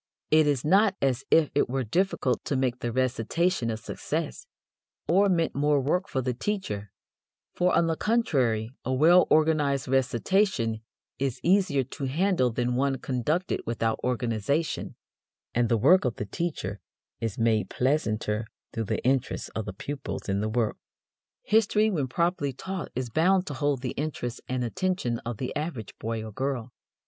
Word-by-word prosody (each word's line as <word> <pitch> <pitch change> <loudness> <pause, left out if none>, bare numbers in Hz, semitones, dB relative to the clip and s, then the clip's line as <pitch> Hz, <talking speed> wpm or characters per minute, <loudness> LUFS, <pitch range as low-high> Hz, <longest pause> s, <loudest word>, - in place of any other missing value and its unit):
It 155 -1 +5
is 140 -3 +1
not 200 +4 +4
as 135 -1 +1
if 160 -3 +4
it 145 - +2
were 130 +1 -1
difficult 135 - 0
to 140 - -1
make 130 -2 0
the 120 - -2
recitation 130 - 0
a 110 - -2
success, 155 - -4 0.6
or 195 +3 +4
meant 165 -3 +1
more 145 +1 +2
work 180 +8 0
for 130 - -1
the 125 0 0
teacher, 120 - -3 0.6
for, 180 0 +2
on 170 - +4
the 165 -1 0
contrary 130 - +1
a 130 - -2
well 165 +7 +5
organized 155 -3 +2
recitation 130 - +1 0.4
is 135 -3 -1
easier 180 -7 +3
to 135 +2 -6
handle 155 -1 +2
than 120 +1 -1
one 135 +2 +1
conducted 140 +8 -1
without 115 -1 0
organization, 125 +5 -1 0.6
and 120 -1 +2
the 115 - +3
work 165 - +5
of 125 -4 -1
the 105 - -4
teacher 105 - -3 0.4
is 115 -3 -3
made 110 -4 +2
pleasanter 110 -5 0 0.3
through 115 -1 -2
the - - -3
interest 130 0 0
of 110 - -3
the 105 - -4
pupils 135 +9 -6
in 100 0 0
the 110 - -1
work. 110 -1 0 0.7
History 215 0 +3
when 150 -8 0
properly 170 -1 0
taught 190 +6 -5
is 125 -2 -3
bound 185 +6 +3
to 145 - -5
hold 140 -1 -1
the 125 - -2
interest 135 -5 -4
and 130 -1 -1
attention 155 -3 -1
of 120 -2 -5
the 125 - -4
average 150 - -4
boy 115 0 -3
or 110 - -7
girl. 130 0 -3
135 Hz, 165 wpm, -27 LUFS, 115-165 Hz, 0.7 s, It